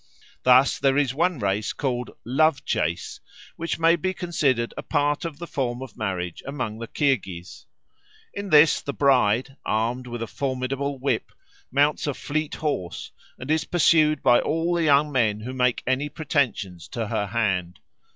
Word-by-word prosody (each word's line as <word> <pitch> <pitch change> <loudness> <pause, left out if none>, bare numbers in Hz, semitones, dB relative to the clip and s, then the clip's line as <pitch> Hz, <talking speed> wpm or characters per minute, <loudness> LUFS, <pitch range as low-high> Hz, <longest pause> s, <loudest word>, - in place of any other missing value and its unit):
Thus 130 +2 +5
"there 135 0 +2
is 140 -4 +2
one 170 +3 +1
race, 100 -1 -1
called 125 -3 -2
the - - -14
'Love 145 +3 +2
Chase,' 85 +3 -2 0.4
which 165 +1 -3
may 165 +1 +4
be 185 +3 -2
considered 145 -10 0
a - - -5
part 145 +2 0
of 160 -4 -5
the 170 - -6
form 130 -5 -3
of 130 - -11
marriage 90 -6 -3
among 125 -6 -4
the 115 - -6
Kirghiz. 100 - -2 0.7
In 200 -1 -5
this 150 -1 +6
the 140 - -4
bride, 130 -1 +2
armed 120 +4 -1
with 120 -1 -5
a - - -2
formidable 135 +3 -3
whip, 135 +2 -1 0.4
mounts 145 +3 +2
a 145 - -1
fleet 155 +1 -3
horse, 140 - -3 0.3
and 130 +4 -5
is 160 0 +2
pursued 155 -3 +3
by 120 - +6
all 165 +3 0
the 170 -1 +1
young 145 0 +4
men 110 -6 +1
who 125 +4 -6
make 125 -1 +1
any 130 +4 0
pretensions 125 - -2
to 115 -2 -4
her 110 -3 -1
hand. 95 -5 -1
135 Hz, 170 wpm, -24 LUFS, 115-150 Hz, 0.7 s, this